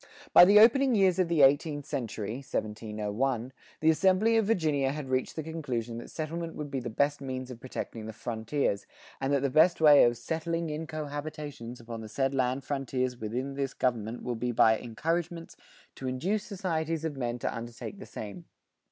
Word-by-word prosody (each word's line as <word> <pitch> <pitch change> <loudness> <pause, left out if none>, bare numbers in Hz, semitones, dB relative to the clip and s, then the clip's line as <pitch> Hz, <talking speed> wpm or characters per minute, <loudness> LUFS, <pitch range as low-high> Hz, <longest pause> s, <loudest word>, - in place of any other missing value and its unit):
By - - +10
the 200 +3 +6
opening 250 +3 +6
years 190 -3 +3
of 185 - +3
the 165 -4 +3
eighteenth 145 +1 +3
century 115 -5 -4
(1701), 110 +1 -3 0.3
the 160 - +4
assembly 190 +7 +3
of 220 -3 +3
Virginia 150 -10 +1
had 145 -2 -5
reached 130 0 0
the 160 - -3
conclusion 125 -8 -4
that - - -10
settlement 165 +1 -4
would 150 -2 -6
be 135 - -1
the 120 - -5
best 140 +5 0
means 130 -1 -5
of 120 - -9
protecting 115 -3 -6
the - - -5
frontiers, 110 0 -2 0.3
and 135 +1 0
that 140 -1 +2
the 140 - +2
best 165 +5 +5
way 150 -2 +8
of 120 0 +1
"settling 165 +2 -2
in 155 +2 -4
co 155 -1 -4
habitations 145 -5 -6
upon 115 -1 -7
the 110 - -8
said 135 +4 0
land 130 0 0
frontiers 130 -2 -2
within 125 +6 -3
this 135 -1 -3
government 115 -2 -1
will 125 - -2
be 120 +1 -2
by 110 -1 +5
encouragements 165 - -3 0.4
to 130 - -6
induce 180 +12 -1
societies 165 -5 -2
of 155 -3 -3
men 120 -2 -2
to - - -3
undertake 120 - -7
the 200 - -9
same." 100 -5 -8
140 Hz, 185 wpm, -29 LUFS, 120-160 Hz, 0.4 s, By